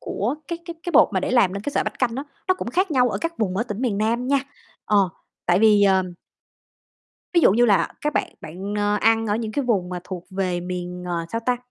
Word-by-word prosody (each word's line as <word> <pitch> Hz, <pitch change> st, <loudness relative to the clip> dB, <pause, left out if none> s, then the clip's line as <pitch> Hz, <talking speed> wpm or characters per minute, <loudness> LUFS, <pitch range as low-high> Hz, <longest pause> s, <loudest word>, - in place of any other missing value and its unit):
của 235 Hz, +8 st, -2 dB
cái 340 Hz, -1 st, -3 dB
cái 340 Hz, -1 st, -6 dB
cái 350 Hz, -, -3 dB
bột -, -, +6 dB
mà 190 Hz, -, +1 dB
để -, -, -2 dB
làm 220 Hz, -8 st, +4 dB
nên 200 Hz, 0 st, -5 dB
cái 290 Hz, -, -3 dB
sợi -, -, +1 dB
bánh -, -, -3 dB
canh 245 Hz, -3 st, +1 dB
á, 270 Hz, -, -2 dB, 0.3 s
nó 370 Hz, -, +4 dB
cũng 370 Hz, -, -5 dB
khác 370 Hz, +6 st, +1 dB
nhau 250 Hz, -3 st, +3 dB
ở -, -, -2 dB
các 335 Hz, 0 st, -3 dB
vùng 190 Hz, -4 st, -1 dB
ở 225 Hz, -, +1 dB
tỉnh 215 Hz, -1 st, -6 dB
miền 220 Hz, -6 st, 0 dB
Nam 230 Hz, +3 st, 0 dB
nha. 280 Hz, -, +4 dB, 0.5 s
Ờ, 200 Hz, -3 st, +3 dB, 0.4 s
tại 175 Hz, +1 st, +4 dB
vì, 210 Hz, -2 st, +5 dB
ờm 190 Hz, -2 st, +2 dB, 1.2 s
Ví 340 Hz, -, +6 dB
dụ 195 Hz, -, +6 dB
như 240 Hz, +3 st, +4 dB
là 205 Hz, -4 st, +3 dB
các 300 Hz, 0 st, -1 dB
bạn -, -, -1 dB
bạn, 190 Hz, +6 st, -6 dB
oe, 205 Hz, 0 st, +1 dB
ăn 225 Hz, 0 st, +3 dB
ở 210 Hz, 0 st, +1 dB
những 220 Hz, -2 st, -4 dB
cái 285 Hz, -, -1 dB
vùng 200 Hz, -7 st, +1 dB
mà 180 Hz, -1 st, -5 dB
thuộc 185 Hz, -2 st, -7 dB
về 185 Hz, -2 st, -1 dB
miền, 180 Hz, 0 st, -5 dB
ờ, 170 Hz, -1 st, -2 dB
sao 230 Hz, -, -1 dB
ta, 250 Hz, -1 st, +2 dB
210 Hz, 255 wpm, -23 LUFS, 185-250 Hz, 1.2 s, bột